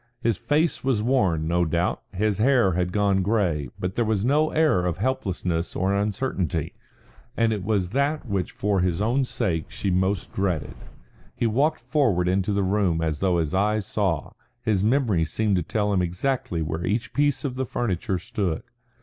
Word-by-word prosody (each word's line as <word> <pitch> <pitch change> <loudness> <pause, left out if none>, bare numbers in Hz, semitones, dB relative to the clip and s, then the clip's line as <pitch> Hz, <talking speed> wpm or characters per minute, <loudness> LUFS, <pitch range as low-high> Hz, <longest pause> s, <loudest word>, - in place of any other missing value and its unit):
His 115 -2 +1
face 150 - 0
was 125 -6 +1
worn, 95 -11 +1
no 85 +1 +2
doubt, 85 +2 0
his 105 +1 0
hair 120 -4 +4
had 90 +1 0
gone 100 -1 +2
grey, 90 - 0
but 90 +1 -3
there 120 - +1
was 110 -2 0
no 150 +4 +3
air 155 - +2
of 85 - -2
helplessness 95 -7 -2
or 95 +1 +1
uncertainty, 100 - -1 0.6
and 115 -1 +3
it 100 -3 -4
was 100 -4 0
that 140 +4 0
which 100 -5 -2
for 100 -1 0
his 90 -1 0
own 120 +6 +2
sake 80 - -1
she 100 - -2
most 95 +1 0
dreaded. 90 -7 -1 0.6
He - - -1
walked 140 +8 +1
forward 115 - +1
into 95 +2 +1
the 100 0 +1
room 95 -3 +1
as 80 -2 -1
though 95 -2 +2
his 80 -3 -1
eyes 105 +2 +1
saw; 95 -8 -1 0.3
his 105 -5 +1
memory 110 -7 +2
seemed 105 +5 0
to - - +1
tell 105 +4 -1
him 95 - +2
exactly 90 -1 -1
where 80 +2 -3
each 110 +6 -1
piece 145 -1 +1
of 135 - -2
the 130 0 -3
furniture 100 -4 -1
stood. 90 -1 -2
100 Hz, 180 wpm, -25 LUFS, 90-115 Hz, 0.6 s, hair